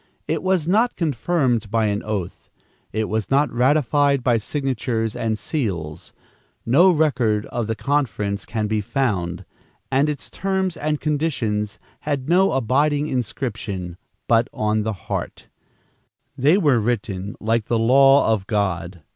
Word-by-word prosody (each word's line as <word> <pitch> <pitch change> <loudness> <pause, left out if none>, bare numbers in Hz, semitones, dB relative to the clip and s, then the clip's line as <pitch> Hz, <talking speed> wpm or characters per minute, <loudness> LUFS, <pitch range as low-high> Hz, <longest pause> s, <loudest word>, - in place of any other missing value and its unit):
It - - -1
was 185 -4 +1
not 225 +7 +2
confirmed 135 - 0
by 110 +1 +1
an 105 -1 0
oath; 100 -5 -5 0.4
it 110 -1 -1
was 110 -1 -2
not 140 +2 +2
ratified 140 +1 +2
by 120 -2 +3
signatures 115 -3 -2
and 110 -1 -1
seals; 85 - -4 0.5
no 155 +11 +5
record 125 - +1
of 120 -3 -2
the 110 - -1
conference 105 -8 -1
can 110 -2 -2
be 105 0 0
found, 100 -8 -2 0.5
and 140 +3 +3
its 145 -3 -5
terms 190 -2 -1
and 150 -1 -2
conditions 115 -9 -1 0.2
had 140 -3 -3
no 185 +4 +3
abiding 145 +4 +1
inscription 110 - -4 0.3
but 115 +1 +3
on 110 0 0
the 110 +1 -2
heart. - - -5 0.9
There 145 +5 +3
they - - +5
were 145 - +3
written 105 -4 -2
like 115 0 0
the 115 - 0
law 135 +1 +5
of 100 -3 -3
God. 90 -5 -2
120 Hz, 140 wpm, -22 LUFS, 105-145 Hz, 0.9 s, no